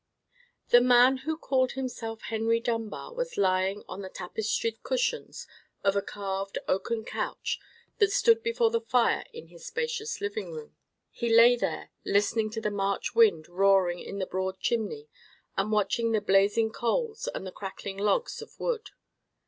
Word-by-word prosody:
The 240 - +7
man 250 +1 +6
who 315 - 0
called 260 -5 +1
himself 240 -4 -5
Henry 225 +1 +1
Dunbar 230 - -3
was - - -4
lying 190 +1 +1
on 185 +2 -7
the 190 - -7
tapestried 215 +4 -3
cushions 485 -1 -2 0.4
of 195 0 +3
a 200 - +2
carved 195 -1 -4
oaken 220 +4 -1
couch - - -3 0.4
that 410 -2 +4
stood 460 +2 +4
before 460 0 +1
the 460 -1 +1
fire 460 - +2
in 465 0 -11
his - - -12
spacious 470 -1 -2
sitting 420 +1 -4
room. 460 -1 -9 0.4
He 235 - -3
lay 230 +2 +7
there, 240 - -3
listening 215 +2 +1
to 225 +1 -5
the 210 - -1
March 200 +2 -1
wind 210 -9 +4
roaring 185 -1 +3
in 200 - -7
the 190 - -1
broad 190 +1 -3
chimney, 240 - -2 0.5
and 200 +2 0
watching 215 +2 +1
the 215 - +3
blazing 205 +3 +3
coals 440 - -1
and - - -5
the 185 - -6
crackling 195 0 -7
logs 455 - 0
of 455 - -13
wood. 460 -3 -2
225 Hz, 160 wpm, -28 LUFS, -, 0.5 s, The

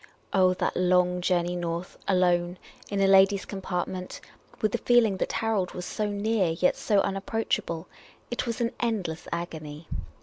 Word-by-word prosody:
Oh, 185 -1 +4
that - - -1
long 180 0 +3
journey 175 -1 +1
north, 170 +1 -4
alone, 180 -1 +2 0.3
in 200 - -1
a - - +5
ladies' 195 0 +5
compart 190 -3 -3
ment 185 -1 -6 0.2
— - - -27
with 215 - +1
the - - -1
feeling 230 -5 +4
that - - -1
Harold 215 -5 0
was 180 - -5
so 210 +3 -2
near, 205 -1 +1
yet 180 +2 +2
so 205 -2 +2
unapproachable; 195 -4 -2 0.4
it 240 - -2
was 230 -1 -2
an 235 0 +1
endless 200 -9 -2
agony. 160 -2 -5
185 Hz, 165 wpm, -27 LUFS, 175-205 Hz, 0.4 s, a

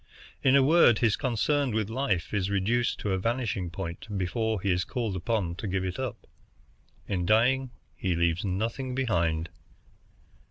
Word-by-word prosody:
In 130 0 +4
a 140 - +6
word, 145 -6 +6
his 110 -3 +2
concern 135 0 0
with 110 -2 0
life 110 -8 -1
is 100 -2 0
reduced 110 +5 +1
to 105 - -1
a 95 - +1
vanishing 115 -4 -1
point 85 +1 -6
before 110 +4 -1
he 95 +1 0
is 90 +1 +1
called 110 -8 -3
on 100 -7 +1
to 105 - -4
give 95 0 -1
it 90 +4 -4
up. 130 -4 -5 0.8
In 90 -3 -1
dying 125 +7 +3 0.3
he 95 -3 -1
leaves 85 +1 +1
nothing 115 +7 -2
behind." 85 -10 0
105 Hz, 160 wpm, -28 LUFS, 95-120 Hz, 0.8 s, a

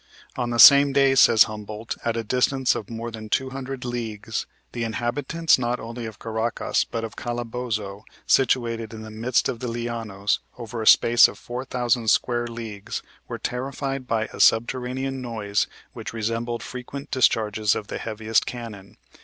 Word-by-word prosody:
On 120 -2 -2
the 120 - -2
same 140 +3 +9
day, 135 -1 +4
says 115 -4 +7
Humboldt, 110 +1 -6
at 115 -1 -1
a 115 - -2
distance 130 +3 +2
of 105 - -6
more 115 0 -5
than 110 -1 -8
200 130 +1 -3
leagues, 115 -4 -4 0.2
"the 120 - -3
inhabitants 130 +8 +1
not 120 0 -1
only 115 0 -6
of 110 - -9
Caracas, 115 0 -1
but 115 - -5
of 110 - -6
Calabozo, 115 -4 -4 0.2
situated 115 -4 +1
in 110 - -8
the 110 - -9
midst 115 +3 +1
of 115 - -3
the 125 - -4
Lianos, 115 -4 -2 0.2
over 115 -1 -6
a 110 - -3
space 120 0 +7
of - - -10
4,000 120 -1 -2
square 120 +1 +2
leagues, 115 -4 -6 0.2
were - - -5
terrified 135 +1 -4
by 110 -2 0
a - - -9
subterranean 130 +3 +1
noise 110 -4 -1 0.3
which - - -7
resembled 115 +1 -2
frequent 140 +3 -8
discharges 110 -5 +2
of 105 - -4
the - - -6
heaviest 110 0 0
cannon. 110 -5 -8
115 Hz, 160 wpm, -24 LUFS, 110-125 Hz, 0.3 s, same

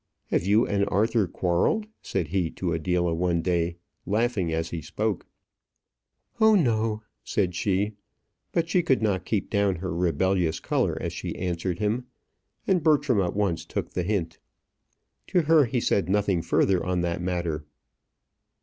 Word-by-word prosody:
"Have - - +2
you 105 +4 +4
and 100 -1 +1
Arthur 105 +1 +2
quarrelled?" 90 - +1 0.2
said 90 -6 -2
he 90 -1 0
to 85 0 -3
Adela 85 +1 0
one 85 0 0
day, 85 -1 0 0.3
laughing 105 -4 +1
as 80 +1 -2
he 85 - -4
spoke. 105 +6 -2 1.1
"Oh, 220 -1 +6
no," 110 - +1 0.2
said 95 -4 0
she; 100 +3 0 0.6
but 165 -1 0
she 175 +2 +2
could 130 -8 +1
not 95 -4 0
keep 105 -3 -2
down 100 -2 +2
her 90 +1 -4
rebellious 90 -1 +1
colour - - 0
as - - -3
she - - -5
answered 90 0 -2
him, 110 +4 -1 0.6
and 185 -3 +2
Bertram 145 -8 +3
at 90 0 -1
once 100 -5 0
took - - -4
the 90 - -1
hint. 85 -3 -2 0.9
To 180 - +2
her 155 -1 +5
he 125 +1 -1
said 100 -5 +1
nothing 100 -3 +2
further 95 +2 +2
on 90 -1 0
that 85 0 -2
matter. 85 -4 -2
95 Hz, 155 wpm, -26 LUFS, 85-110 Hz, 1.1 s, Oh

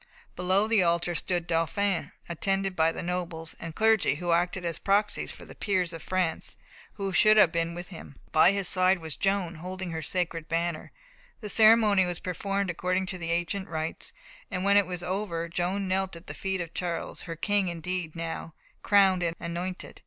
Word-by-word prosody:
Below 185 +4 +2
the 220 -3 +4
altar 170 0 +1
stood 175 +1 -1
the - - -23
Dauphin, 170 +3 0 0.2
attended 195 +2 -1
by 160 -1 +3
the - - -6
nobles 170 -2 -3
and 165 -2 -7
clergy 220 -8 +3
who 175 +2 -2
acted 175 +1 +1
as 165 -2 -2
proxies 205 +1 +1
for - - -11
the - - -11
peers 185 -5 -1
of 165 - -7
France 185 -3 0 0.4
who 195 -2 -4
should 215 +3 +6
have 185 -6 +7
been 170 0 -1
with 175 +1 -7
him. 165 -6 -10 0.2
By 165 +3 +6
his 200 -2 0
side 185 0 +4
was 160 -3 -5
Joan, 195 -3 0
holding 185 0 -5
her 160 -1 -3
sacred 165 0 -2
banner. 165 -1 -2 0.5
The 210 - -5
ceremony 215 -2 +6
was 175 -1 -2
performed 195 +1 -2
according 185 +2 -1
to 185 - -7
the 165 -1 -4
ancient 175 +3 -1
rites, 160 0 -3 0.4
and 180 - -3
when 200 +1 +4
it 205 -2 +5
was 180 -1 -5
over, 180 -2 -2
Joan 180 +4 -1
knelt 190 0 0
at 170 +2 -12
the - - -7
feet 190 -1 -2
of 170 -1 -6
Charles, 175 -2 -3
her 165 - -3
King 200 +3 +1
indeed 170 -1 -4
now, 165 -1 -5 0.3
crowned 195 -3 +4
and 170 -1 0
anointed. 175 +2 -5
180 Hz, 190 wpm, -28 LUFS, 170-195 Hz, 0.5 s, have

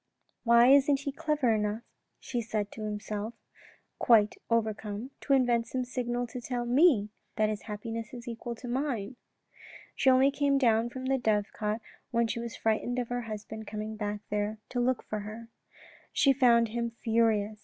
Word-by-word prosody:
"Why 235 +1 +6
isn't 280 0 +5
he 280 - -3
clever 300 -5 +1
enough," 210 +1 -1 0.4
she 240 - -3
said 215 -2 -3
to 220 - -9
herself, 210 +1 -4 0.6
quite 215 -3 +5 0.2
overcome, 220 +1 -1
" - - -45
to 275 - +1
invent 245 -3 +3
some 255 -1 -2
signal 245 0 -2
to 245 +1 -7
tell 245 0 -3
me 245 - +4 0.2
that 215 -1 +2
his 215 -1 -3
happiness 225 +1 -5
is 240 -1 -9
equal 235 0 -5
to 245 +2 -9
mine? 245 -3 -2 0.4
" - - -18
She 270 - +3
only 260 +2 +5
came 280 -1 +2
down 230 -3 +3
from 260 +1 -7
the 265 0 +1
dovecot 215 0 -1 0.3
when 235 0 +2
she 230 +1 -3
was 235 0 -5
frightened 225 +3 0
of 245 -2 -2
her 245 0 -1
husband 220 -1 -7
coming 215 +1 -5
there 210 0 -3
to 245 - -2
look 250 +1 +1
for 215 - -4
her. 215 +3 -8 0.6
She 275 - +4
found 235 -3 +4
him 235 +1 -2
furious. 220 -2 +2
230 Hz, 175 wpm, -29 LUFS, 215-250 Hz, 0.6 s, Why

